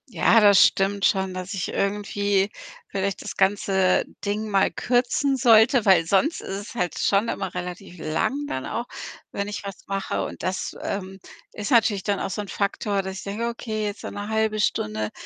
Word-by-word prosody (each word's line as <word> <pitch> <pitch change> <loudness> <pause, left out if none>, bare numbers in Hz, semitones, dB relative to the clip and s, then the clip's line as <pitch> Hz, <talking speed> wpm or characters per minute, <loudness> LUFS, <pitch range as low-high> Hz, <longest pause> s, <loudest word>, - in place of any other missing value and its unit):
Ja, 225 +2 +4
das 205 -2 +7
stimmt 195 +1 +1
schon, 190 -1 +1
dass 185 +1 -5
ich 190 -3 -3
irgendwie 200 0 0 0.4
vielleicht 195 0 -2
das - - -7
ganze 190 -1 +2 0.2
Ding 210 +2 -2
mal 195 -2 +3
kürzen 250 +3 +1
sollte, 235 -1 +5
weil 185 -5 +5
sonst 200 - +1
ist - - -9 0.2
es - - -11
halt 180 -7 -2
schon 200 +3 +2
immer 190 -2 -3
relativ 180 +1 -6
lang 160 - -1
dann 130 - -4
auch, 235 - -3 0.5
wenn 200 0 -3
ich 205 -1 -5
was 195 -2 -8
mache 195 0 -2
und - - -8
das, 185 0 -3
ähm, 190 -1 -4 0.3
ist 210 +3 -5
natürlich 220 -5 +3
dann 200 -1 0
auch 195 - -3
so 210 - -3
'n 205 - -8
Faktor, 200 0 -1
dass 190 0 -5
ich - - -7
denke: 210 +4 -3
„Okay, 220 -2 -3
jetzt 205 +1 -4
so - - -5
'ne 205 0 -6
1/2 220 0 0
Stunde, 105 - -1
200 Hz, 190 wpm, -24 LUFS, 190-215 Hz, 0.5 s, das